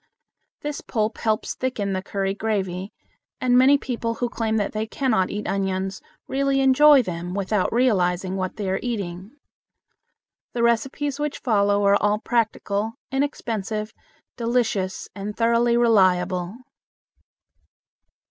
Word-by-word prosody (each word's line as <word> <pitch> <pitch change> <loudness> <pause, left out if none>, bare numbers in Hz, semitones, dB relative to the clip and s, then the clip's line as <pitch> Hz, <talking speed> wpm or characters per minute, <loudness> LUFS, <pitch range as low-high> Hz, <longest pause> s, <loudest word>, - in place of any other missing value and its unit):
This 295 -1 -4
pulp 220 -1 -2
helps 215 -1 0
thicken 215 -7 -2
the 185 - -1
curry 195 0 -2
gravy, 195 -3 -2 0.5
and 250 -1 +2
many 265 +3 +6
people 235 -4 -3
who 245 +1 -2
claim 220 -2 -1
that 205 -2 -1
they 215 +1 -3
cannot 220 -7 0
eat 210 +1 -4
onions 190 0 -2 0.3
really 275 0 +1
enjoy 270 +1 +6
them 175 -1 -5
without 200 0 0
realizing 190 -6 +1
what 185 -1 -3
they 205 -2 -4
are 190 - 0
eating. 195 -6 -4 1.2
The 235 - -1
recipes 270 +5 0
which 295 -1 -2
follow 205 -3 +2
are 200 0 +4
all 210 0 +2
practical, 220 -2 -1 0.2
inexpensive, 225 -6 -2 0.4
delicious, 230 -6 -1
and 205 +2 -6
thoroughly 235 +1 +3
reliable. 185 -5 +2
215 Hz, 125 wpm, -23 LUFS, 195-240 Hz, 1.2 s, many